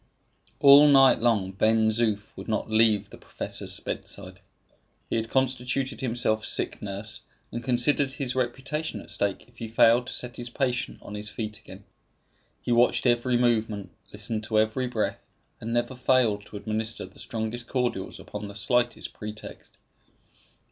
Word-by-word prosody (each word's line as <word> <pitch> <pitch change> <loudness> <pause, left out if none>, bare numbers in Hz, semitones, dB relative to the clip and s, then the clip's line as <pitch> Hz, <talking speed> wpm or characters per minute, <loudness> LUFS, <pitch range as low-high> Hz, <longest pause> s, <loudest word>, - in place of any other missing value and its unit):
All 140 +1 +9
night 135 -2 +6
long 110 -5 +2
Ben 110 +3 +3
Zoof 110 -2 -1
would - - -9
not 110 0 -2
leave 110 -2 +3
the - - -12
professor's - - -3
bedside. - - -6 0.7
He - - +1
had 115 0 -1
constituted 130 -1 0
himself 115 -3 0
sick - - -1
nurse, 105 +1 -5 0.3
and 120 - -5
considered 130 +2 +2
his 135 -2 -1
reputation 135 +5 -2
at - - -7
stake 100 -1 -2
if 120 -1 -25
he 115 - -4
failed 115 +2 +4
to - - -3
set 120 -2 -3
his 120 0 -4
patient 125 -1 -1
on 100 - -9
his 105 0 -4
feet 105 -1 -5
again. - - -13 0.8
He - - -2
watched 120 +2 +3
every 120 0 +3
movement, 110 -4 0 0.2
listened 110 -2 -3
to 110 -1 0
every 110 +4 +1
breath, 115 -3 -2 0.4
and 115 - -5
never 120 +2 0
failed 125 -5 +2
to 105 - -8
administer 110 +1 -3
the 95 - -16
strongest 115 +2 -4
cordials 125 -2 -2
upon 105 0 -7
the 100 - -10
slightest 120 +3 0
pretext. 105 0 -9
115 Hz, 155 wpm, -27 LUFS, 110-125 Hz, 0.8 s, All